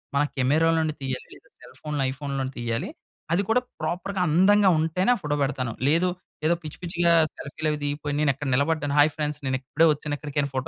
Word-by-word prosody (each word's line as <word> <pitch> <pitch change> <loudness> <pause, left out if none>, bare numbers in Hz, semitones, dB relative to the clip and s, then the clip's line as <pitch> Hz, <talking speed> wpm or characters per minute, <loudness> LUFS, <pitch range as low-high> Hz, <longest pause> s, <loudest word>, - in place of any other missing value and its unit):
మన 140 - +4 0.2
కెమెరాలనుండి 155 +4 +2
తీయాలి. 130 -2 -4
లేదా - - -20
సెల్ - - -15
ఫోన్‌లో, 150 -2 -2
ఐఫోన్‌ 140 +1 -5
లోనే 135 0 -3
తీయ్యాలి. 115 -1 -2 0.4
అది 190 +4 +2
కూడా 240 +3 +4 0.2
ప్రాపర్‌గా, 180 +4 -2
అందంగా 195 +5 +5
ఉంటేనే 165 +8 +1
ఆ - - -5
ఫోటో 145 0 -1
పెడతాను. 130 -4 -2 0.2
లేదు 170 +4 +3 0.4
ఏదో 170 - +3
పిచ్చి 155 - -8
పిచ్చిగా 170 0 +2 0.2
సెల్ఫీలు 155 +2 -4
అవి 150 - -3
దిగిపోయి, 145 0 -2
నేను 150 -2 +4
ఎక్కడ 145 +2 -5
నిలబడ్డాను 145 +1 0
హాయి 150 +2 +6
ఫ్రెండ్స్ 150 -1 -2
నేను 130 0 +1
ఇప్పుడే 150 +5 +2
వచ్చాను 150 0 -4
ఇక్కడికని, 145 -1 -2
ఫోటో 130 0 -2
150 Hz, 190 wpm, -25 LUFS, 140-165 Hz, 0.4 s, హాయి